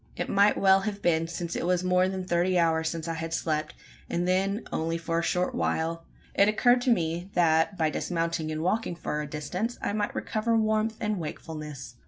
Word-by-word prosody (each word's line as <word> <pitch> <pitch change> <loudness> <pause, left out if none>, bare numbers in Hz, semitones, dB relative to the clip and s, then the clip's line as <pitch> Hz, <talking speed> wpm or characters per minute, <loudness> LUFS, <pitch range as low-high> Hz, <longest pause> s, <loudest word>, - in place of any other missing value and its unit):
It - - -3
might 200 +1 +4
well 190 0 +5
have 200 0 -4
been 165 -1 +2
since 170 0 -4
it - - -2
was 180 0 +1
more 185 0 +3
than 190 -1 -4
thirty 180 +1 +1
hours 160 -1 +2
since 165 -1 -5
I 165 - -1
had 165 0 -3
slept, 155 -2 -2 0.3
and 175 +1 -1
then 195 +4 0
only 165 +1 -1
for 165 0 -1
a - - 0
short 180 +1 0
while. 165 +1 -1 0.3
It 200 - +4
occurred 245 +3 +4
to 255 - 0
me 175 -4 0
that, 165 +2 +3
by 155 -2 +1
dismounting 165 -2 -2
and 155 +1 -3
walking 200 0 0
for 150 -2 -3
a 150 - -5
distance, 180 +11 -3
I - - -2
might 205 -1 -2
recover 225 +1 0
warmth 220 0 +1
and 210 -3 -1
wakefulness. 150 -5 -7
175 Hz, 205 wpm, -27 LUFS, 160-200 Hz, 0.3 s, well